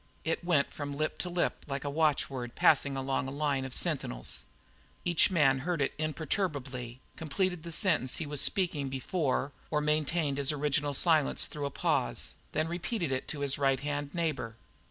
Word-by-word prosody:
It 165 +1 -1
went 165 -5 +2
from 145 -1 -5
lip 155 +1 -1
to 180 - -2
lip 175 0 -1
like 140 -1 -3
a 145 - -2
watchword 140 -5 0
passing 140 -2 +4
along 135 -1 -1
a - - -4
line 140 -2 0
of 130 - -6
sentinels. - - 0 0.6
Each 175 -2 +5
man 145 -7 +4
heard 170 +4 -1
it 140 - +1
imperturbably, 145 - -2 0.2
completed 180 +3 -1
the 170 +1 -7
sentence 160 - +3
he 165 - -3
was 145 -1 -1
speaking 160 -8 0
before, 135 +1 -1 0.2
or 150 - +1
maintained 150 -1 +1
his 140 +1 +1
original 145 -1 0
silence 155 -2 +3
through 145 -2 -4
a - - -3
pause, - - 0 0.2
and 155 - +1
then - - -4
repeated 175 - -2
it 130 - -2
to 145 - -4
his 140 -1 0
right 135 -2 +3
hand 145 0 -3
neighbour. 150 -10 -2
145 Hz, 175 wpm, -31 LUFS, 135-160 Hz, 0.6 s, Each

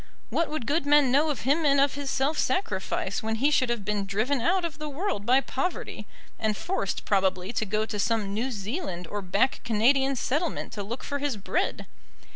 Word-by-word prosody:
What 335 - +1
would 305 -6 -3
good 290 +2 0
men 290 -3 +5
know 295 +4 +4
of 290 - -2
him 290 +6 +2
and 280 -2 +4
of 280 0 +3
his 285 -1 -4
self 275 +4 0
sacrifice 380 - -1
when 220 0 -1
he 275 +6 +2
should 260 -4 +3
have 235 -4 -2
been 205 -1 -1
driven 225 +7 0
out 350 +6 +2
of 320 -2 -5
the 305 0 -4
world 285 - -3
by 260 +2 +5
poverty, 275 +7 -3 0.3
and 215 -2 0
forced 350 - -2
probably 190 0 +1
to 220 - 0
go 215 +2 0
to 215 -2 -4
some 210 -2 0
New 235 +6 -1
Zealand 210 - -4
or 205 +5 -4
back 200 +8 +1
Canadian 265 +5 +3
settlement 295 +7 -1
to 210 - -4
look 230 +6 -5
for 285 - -3
his 280 -5 -1
bread? 330 - -1
260 Hz, 205 wpm, -27 LUFS, 210-290 Hz, 0.3 s, men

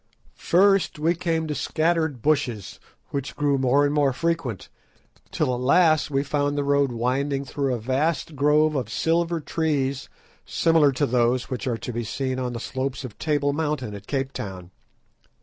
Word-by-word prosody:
First 195 0 +3
we 160 +3 +2
came 165 -2 -1
to 155 - -3
scattered 160 -4 0
bushes 140 -9 -1 0.3
which 140 -2 -4
grew 145 -2 +1
more 135 +2 +3
and 145 - 0
more 145 -3 +2
frequent, 155 - -2 0.6
till 130 - 0
at 125 - -3
last 155 +4 +4
we 140 -1 0
found 145 0 -1
the 145 - +1
road 140 -1 +2
winding 135 +4 -1
through 135 0 -2
a 125 - 0
vast 145 +7 -1
grove 150 +2 +3
of 130 -7 -2
silver 165 +7 0
trees 140 -4 -1 0.3
similar 165 -4 +3
to 145 +3 +1
those 125 0 +1
which 130 0 -3
are 120 -3 0
to 125 - -6
be 120 +1 -2
seen 130 +3 -3
on 125 -1 -3
the 115 - -4
slopes 130 +2 -4
of 115 - -10
Table 145 -2 +1
Mountain 150 -7 -2
at 100 - -10
Cape 135 -1 -2
Town. 95 -3 -7
140 Hz, 170 wpm, -24 LUFS, 125-155 Hz, 0.6 s, last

